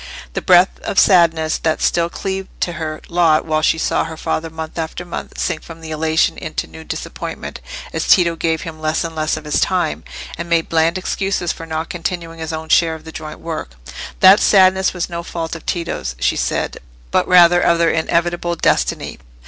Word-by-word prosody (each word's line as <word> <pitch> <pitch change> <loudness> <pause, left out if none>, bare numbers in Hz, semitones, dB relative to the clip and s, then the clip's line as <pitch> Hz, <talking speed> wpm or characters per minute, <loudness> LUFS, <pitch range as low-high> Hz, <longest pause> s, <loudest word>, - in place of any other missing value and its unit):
The - - -2
breath 180 +1 +4
of - - -5
sadness 165 -4 +4
that 160 -1 0
still 170 0 +1
cleaved 190 +1 -4
to 175 - 0
her 155 -2 -5
lot 170 -3 +3
while 155 -1 0
she 160 - +2
saw - - +1
her 160 0 -7
father 165 +1 -2
month 160 +1 -7
after 165 +2 -4
month 175 - -7
sink 160 -3 -2
from 165 -1 -12
elation 160 0 0
into - - -4
new 80 0 -12
disappointment 75 - -6 0.3
as - - -2
Tito 170 -2 +5
gave 160 -1 -1
him 160 -1 -8
less 155 +2 0
and 165 -1 -5
less 155 0 0
of 155 - -9
his 150 - +1
time, 185 -2 0 0.4
and 170 0 -5
made 165 -1 +1
bland 165 +2 +2
excuses 185 -1 -1
for 165 - -8
not 160 +1 -3
continuing 170 -2 -4
his 160 0 -4
own 160 0 -5
share 165 -1 +4
of 160 - -12
the 160 - -9
joint 155 -1 -8
work—that 70 - +1
sadness 190 -1 +4
was 180 -2 -3
no 170 -1 -5
fault 165 -1 -5
of 165 - -11
Tito's, 70 - -3
she - - +1
said, - - -2 0.3
but - - +2
rather 175 -1 +6
of 170 - +3
their 170 0 +3
inevitable 170 +1 0
destiny. - - 0
165 Hz, 190 wpm, -18 LUFS, 160-175 Hz, 0.4 s, rather